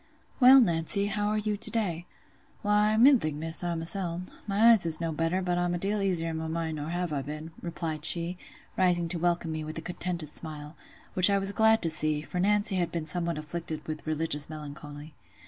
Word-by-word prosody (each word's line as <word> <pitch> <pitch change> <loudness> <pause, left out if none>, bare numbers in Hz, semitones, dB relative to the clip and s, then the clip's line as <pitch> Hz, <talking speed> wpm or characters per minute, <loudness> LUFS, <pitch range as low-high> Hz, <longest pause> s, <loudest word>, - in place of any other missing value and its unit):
"Well, 265 +1 +8
Nancy, 195 -1 +2
how 205 0 -2
are 210 +1 -1
you 210 0 -2
to 215 - -4
day?" 180 -7 -3 0.6
"Why, 210 +1 +2
middling, 230 - +3
Miss, 165 +3 0
i' 175 -1 -2
myseln—my 185 +5 0
eyes 220 -5 +5
is 165 -2 +4
no 165 -1 -3
better, 165 +4 -2
but 175 -1 -1
I'm 175 0 -1
a - - -2
deal 200 +3 -2
easier 175 -4 +1
i' - - -5
my 160 0 -5
mind 160 -1 -4
nor 150 0 -6
I - - -6
have 175 -1 -3 0.2
been," 155 +2 -7
replied 165 -3 -5
she, 170 +2 +3 0.4
rising 175 -2 +1
to 170 - -4
welcome 170 -1 -1
me 155 0 -5
with 155 +1 -7
a - - -5
contented 175 -2 -4
smile; 150 -1 -8 0.4
which 185 +2 +9
I 200 - +2
was 195 0 +1
glad 220 +1 +2
to 165 - +3
see, 155 -1 +2
for 180 - -6
Nancy 205 +1 +1
had 175 -2 -1
been 170 -2 -4
somewhat 170 0 -2
afflicted 155 +1 -7
with 155 0 -7
religious 155 -2 0
melancholy. 150 0 -10
170 Hz, 205 wpm, -27 LUFS, 160-195 Hz, 0.6 s, which